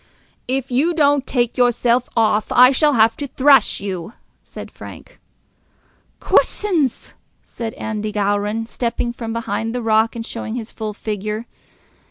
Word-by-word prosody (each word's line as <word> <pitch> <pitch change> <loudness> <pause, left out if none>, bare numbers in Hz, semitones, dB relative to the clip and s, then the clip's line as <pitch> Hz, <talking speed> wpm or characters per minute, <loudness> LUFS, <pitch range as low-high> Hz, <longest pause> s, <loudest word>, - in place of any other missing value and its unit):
"If 265 0 -2
you 310 +8 +1
don't 285 -3 +2
take 240 -3 0
yourself 245 0 +2
off, 215 -1 +2
I 250 +1 +7
shall 295 +2 +2
have 225 -1 +4
to 285 - -4
thrash 275 +1 +4
you," 190 0 -5 0.3
said - - -10
Frank. - - -12 1.0
"Coosins!" 335 - 0 0.3
said 225 -2 -7
Andy 215 -1 -4
Gowran, 205 +2 -1
stepping 235 0 -3
from 230 -2 -6
behind 225 0 -3
the 250 - -2
rock 220 +1 +2
and 230 -1 -5
showing 230 -1 -5
his 235 -2 -6
full 215 -2 -6
figure. 215 +1 -4
230 Hz, 140 wpm, -19 LUFS, 220-255 Hz, 1.0 s, I